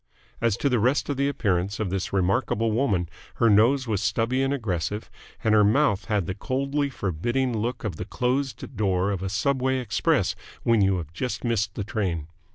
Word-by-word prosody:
As 115 -4 +2
to - - 0
the 125 -4 +2
rest 125 +8 +1
of 140 - -1
the 140 +1 +2
appearance 100 -7 -1
of 105 -5 -1
this 95 -1 -2
remarkable 100 +4 +1
woman, 105 -7 +1 0.3
her 115 -2 +4
nose 120 +6 +4
was 105 -3 0
stubby 115 +6 +1
and 135 0 +1
aggressive, 105 -5 -2 0.3
and 110 - +3
her 105 -1 +6
mouth 105 -3 +3
had 105 -4 0
the 95 - -3
coldly 140 +7 -1
forbidding 120 - -1
look 120 +4 -2
of 100 -8 -3
the 90 - -4
closed 130 +4 -2
door 95 -2 +1
of 95 -3 -3
a 95 - -2
subway 130 +5 +1
express 115 - +1 0.3
when 115 -3 +3
you 95 -1 +3
have 80 -2 -7
just 125 +9 -3
missed 105 -4 0
the 100 - -2
train. 95 -7 -2
110 Hz, 190 wpm, -25 LUFS, 95-130 Hz, 0.3 s, her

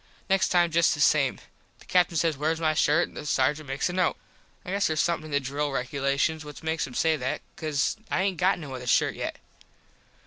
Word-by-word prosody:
Next 195 0 +3
time 175 -2 +3
just 165 0 +3
the - - -9
same. 145 -2 +3 0.4
The - - -19
Captin 180 -2 +2
says 165 -1 +1
wheres 155 +3 -1
my 155 -1 +2
shirt 155 +2 +3
an - - -19
the - - -7
sargent 150 +1 0
makes 135 +1 -1
a 175 - -4
note. 185 -1 +1 0.5
I 180 - -5
guess 200 +1 +1
theres 155 -1 -1
somethin 170 -1 0
in 155 - -9
the 140 - +2
drill 145 +2 -2
regulations 140 +4 -1
what 150 0 -10
makes 160 -1 -1
him 125 - -11
say 160 -1 +2
that 130 -1 -3
cause 155 +2 -1
I 190 - +1
aint 190 -2 -1
got 185 +1 +2
no 150 -6 -8
other 125 -1 -7
shirt - - +3
yet. - - -5
155 Hz, 220 wpm, -26 LUFS, 140-170 Hz, 0.5 s, Next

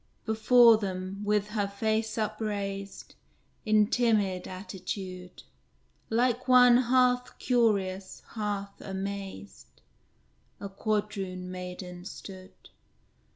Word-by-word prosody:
Before 225 +1 +6
them, 190 -1 -4
with 210 0 +1
her 210 -2 -1
face 220 +3 -1
upraised, 205 -2 -4 0.5
In 215 -1 +5
timid 205 -6 +1
attitude, 185 -1 -7 0.7
Like 245 +2 +1
one 250 -1 +7
half 250 0 +2
curious, 200 -6 0
half 205 -2 -4
amazed, 195 - -6 0.9
A 200 - -6
Quadroon 195 -3 -3
maiden 180 -1 -7
stood. 190 -1 -11
200 Hz, 85 wpm, -28 LUFS, 190-220 Hz, 0.9 s, one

